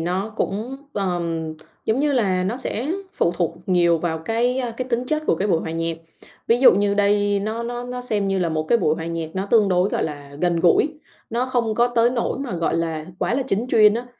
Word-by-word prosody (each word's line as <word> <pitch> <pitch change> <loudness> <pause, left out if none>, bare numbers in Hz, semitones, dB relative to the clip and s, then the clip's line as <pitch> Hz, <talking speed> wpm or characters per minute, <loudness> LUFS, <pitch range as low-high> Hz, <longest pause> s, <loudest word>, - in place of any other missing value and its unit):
nó 185 +6 -2
cũng, 225 +7 -2 0.2
ờm, 170 -4 -2 0.3
giống 220 +4 +1
như 290 0 +2
là 190 -7 +1
nó 215 +6 -1
sẽ 265 +3 -2 0.2
phụ 170 - +1
thuộc 170 -2 0
nhiều 170 -3 +3
vào 160 -1 -2
cái 235 +9 0 0.2
cái 255 0 -4
tính 245 0 0
chất 310 +2 0
của - - +4
cái 195 +5 -1
buổi 165 - +2
hòa 160 - -5
nhạc. 165 0 -2 0.5
Ví 230 - +3
dụ 265 - +8
như 200 +1 +1
đây 205 0 +2
nó 220 +3 -3
nó 240 +1 -4
nó 250 0 -5
xem 210 -5 -1
như 195 - +1
là 175 -2 +1
một 155 -1 -1
cái 230 +9 +2
buổi 155 - +2
hòa 160 0 -5
nhạc 165 -1 -4
nó 190 +1 -2
tương 215 -1 +4
đối, 180 +1 +2
gọi - - -1
là, 145 -2 -7
gần 175 -1 +2
gũi, 295 - +3 0.3
nó 240 +3 0
không 235 -4 0
có 235 +2 +3
tới 240 0 +3
nỗi 245 0 -1
mà, 270 -7 -4
gọi 165 0 0
là, 160 -1 -2
quá 240 - 0
là 270 - +1
chính 220 -2 0
chuyên 215 -3 +6
á. 240 +2 -4
205 Hz, 235 wpm, -22 LUFS, 170-240 Hz, 0.5 s, dụ